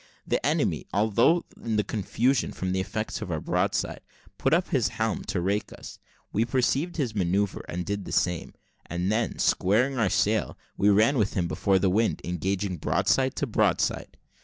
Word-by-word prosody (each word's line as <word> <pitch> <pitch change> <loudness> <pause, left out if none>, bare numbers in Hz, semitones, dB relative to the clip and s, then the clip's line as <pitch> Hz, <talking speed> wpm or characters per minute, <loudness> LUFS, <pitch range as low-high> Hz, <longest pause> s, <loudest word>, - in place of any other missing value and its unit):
The - - -1
enemy, - - 0
although 110 - +3 0.2
in 115 -2 -1
confusion 115 +6 0
from 95 0 -3
the 95 - 0
effects 95 - -3
of - - -5
our - - -1
broadside, - - -1 0.4
put 135 - +1
up 175 +3 +2
his 130 -6 +2
helm 110 -2 -2
to 90 - -2
rake 100 +4 -1
us; - - -10 0.3
we 110 - +2
perceived 130 +8 0
his 130 -8 -1
manoeuvre, 100 0 0
and 90 +1 -3
did 100 +1 -3
the - - -7
same, 90 -2 -1 0.3
and 90 +3 -1
then 110 +1 0
squaring 120 +8 +2
our 105 -4 +2
sail, 105 0 +1 0.2
we 100 - +3
ran 110 +7 +4
with 105 -1 0
him 90 -2 0
before 95 +2 +1
the 95 0 +2
wind, 110 +4 +1
engaging 90 +2 -2
broadside 130 - +1
to - - -1
broadside. 115 - 0
105 Hz, 175 wpm, -26 LUFS, 95-120 Hz, 0.4 s, ran